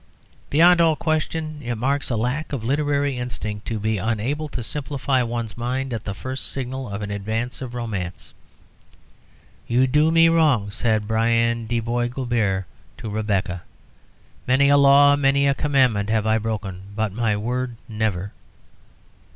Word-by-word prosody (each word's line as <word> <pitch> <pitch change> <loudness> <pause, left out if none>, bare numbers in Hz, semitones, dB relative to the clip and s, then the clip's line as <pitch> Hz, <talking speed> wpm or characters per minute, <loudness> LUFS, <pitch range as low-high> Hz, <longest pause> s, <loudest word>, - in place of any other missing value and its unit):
Beyond 170 +3 +5
all 160 -2 +4
question, 155 -1 -2
it 120 0 -2
marks 135 +5 -1
a 120 - 0
lack 125 +8 -2
of 130 -6 -3
literary 145 +1 0
instinct 110 -4 -5
to 110 -2 -2
be 110 0 -1
unable 120 +9 -2
to 125 - -5
simplify 135 0 -1
one's 115 -2 -3
mind 125 +2 -3
at 110 - -5
the 100 - -4
first 130 +5 -1
signal 130 -1 -4
of 100 +1 -4
the 100 - -4
advance 110 +6 -3
of 125 -2 -6
romance. 95 -8 -5 1.3
"You 125 +2 +3
do 150 +4 +3
me 165 0 +5
wrong," 150 -11 +3
said 110 -1 0
Brian 115 +1 +1
de 120 +1 0
Bois 120 +1 -1
Guilbert 115 -7 -1 0.3
to 115 -3 -6
Rebecca. 100 -4 -1 0.9
"Many 135 +2 +4
a 145 - +6
law, 140 0 +6
many 140 0 +2
a 140 - +4
commandment 130 -8 +1
have 110 -1 +1
I 110 0 +2
broken, 105 -4 -4
but 110 -2 -1
my 110 -2 0
word, 125 +3 -3
never." 105 -3 -2
120 Hz, 155 wpm, -22 LUFS, 110-140 Hz, 1.3 s, a